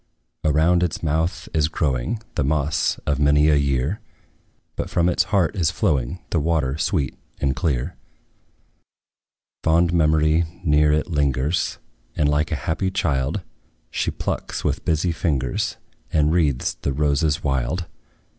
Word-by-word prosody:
Around 80 +3 +3
its 90 -2 -1
mouth 80 +4 -1
is 80 -2 +2
growing 75 - -1
The - - 0
moss 75 +2 +1
of 70 -2 0
many 75 +1 +4
a 75 - +5
year; 70 +5 0 0.8
But - - -3
from 85 0 +2
its 90 - +2
heart 100 -2 +1
is 85 -6 +2
flowing 80 - 0
The 85 - +2
water 75 -4 0
sweet 80 -7 0 0.2
and 70 -2 0
clear. 70 +2 -1 1.7
Fond 85 +1 +3
memory 80 0 +3 0.2
near 75 -2 +4
it 75 +4 0
lingers, 70 +1 0 0.4
And, 75 - +2
like 75 +2 +1
a - - +1
happy 90 +4 0
child, 80 -2 0 0.5
She - - -1
plucks, - - -4
with - - -1
busy 80 +2 +1
fingers, 70 -7 -1 0.3
And 75 -1 +3
wreathes 75 -7 +1
the 70 - -1
roses 75 +1 +1
wild. 70 +5 -1
75 Hz, 135 wpm, -22 LUFS, 70-85 Hz, 1.7 s, a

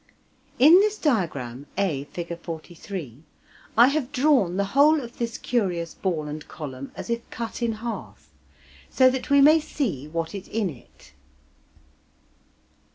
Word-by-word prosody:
In 315 +8 +8
this 425 +1 +2
diagram 145 - -1
(A, 160 -9 0
Fig. 170 +2 -6
43) 165 - -8 0.6
I 240 +2 +8
have 285 -2 -2
drawn 255 - +2
the 200 - +2
whole 300 +3 +5
of 240 -4 -9
this 235 -1 -2
curious 180 -9 -1
ball 165 -6 -2
and 150 +1 -7
column 140 -3 -8
as - - -6
if 235 0 -3
cut 230 +1 -6
in 235 -1 0
half, 200 - -7 0.6
so 260 0 +5
that 260 0 -4
we 280 0 +6
may 305 +3 +7
see 205 - -3
what 165 +1 -3
is 200 -1 -7
in 210 -5 -1
it. 120 -4 -17
200 Hz, 145 wpm, -25 LUFS, 155-255 Hz, 0.6 s, In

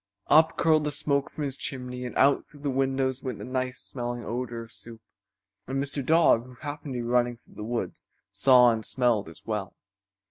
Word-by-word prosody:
Up 160 +2 +6
curled 155 -2 +4
the 150 - 0
smoke 140 -1 0
from 155 - -5
his 135 -2 -3
chimney 125 -2 -5
and 125 - -5
out 140 +1 +4
through 145 - -15
the 145 -1 -1
windows 135 0 0
went 130 -5 -4
the 100 - -8
nice 130 0 -2
smelling 120 -1 -5
odor 120 -1 -4
of 115 - -14
soup, 115 -1 -8 0.7
and 135 +2 -2
Mr. 140 0 -2
Dog, 160 -5 +4
who 125 - -13
happened 145 0 -6
to 120 - -2
be - - -4
running 120 0 +1
through - - -21
the 105 - -7
woods, 120 +2 -4 0.2
saw 125 +4 +6
and 110 -1 -2
smelled 120 -7 +1
as 80 - -15
well. 105 -4 -3
125 Hz, 205 wpm, -27 LUFS, 120-140 Hz, 0.7 s, Up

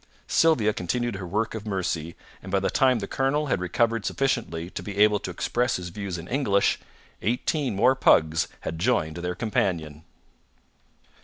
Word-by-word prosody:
Sylvia 125 -11 +3
continued 120 +5 -2
her 95 -2 -6
work 110 +5 -1
of 110 -1 -6
mercy, 85 -4 -2 0.3
and 95 - -9
by 100 - +3
the 95 - -1
time 130 -3 +3
the 100 -3 -4
colonel 135 +3 0
had 125 -10 0
recovered 115 +5 +1
sufficiently 100 -12 -1
to - - -5
be 100 -1 -7
able 105 0 +5
to - - -6
express 120 +7 0
his 90 -1 -5
views 95 0 -5
in 85 +1 -8
English, 110 -6 +2 0.4
eighteen 125 +2 0
more 125 +7 +5
pugs 80 -10 +3
had 80 0 -5
joined 85 -7 +1
their 90 +1 -3
companion. 80 -8 -1
100 Hz, 165 wpm, -25 LUFS, 90-120 Hz, 0.4 s, able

